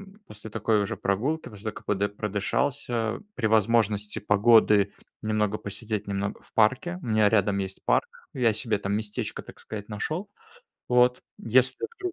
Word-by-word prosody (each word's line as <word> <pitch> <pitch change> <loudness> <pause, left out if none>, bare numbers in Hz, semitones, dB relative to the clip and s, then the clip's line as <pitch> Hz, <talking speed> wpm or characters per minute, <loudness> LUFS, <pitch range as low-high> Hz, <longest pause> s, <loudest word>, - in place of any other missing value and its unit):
м, 210 - -25
после 105 +1 -10
такой 110 0 +1
уже 100 - -3
прогулки, 130 +12 -1
после 105 0 -13
того 110 - -3
как - - -11
подыш 100 0 0
продышался, 110 +2 -1 0.2
при 115 - -2
возможности 110 -1 +2
погоды 105 -1 +4 0.3
немного 105 -1 0
посидеть, 105 0 -4
немного 100 0 -3
в - - -22
парке. 125 +11 +2
У - - -7
меня 110 -2 +4
рядом 100 -2 +2
есть 95 0 -5
парк, - - +3 0.3
я 120 -5 +2
себе 110 -1 -1
там 100 0 -2
местечко, 105 0 -3
так - - -14
сказать, 105 -1 -8
нашел. 155 - -3 0.6
Вот. 125 0 +4 0.2
Если 130 - +2
вдруг 365 -2 -3
110 Hz, 165 wpm, -26 LUFS, 105-120 Hz, 0.6 s, погоды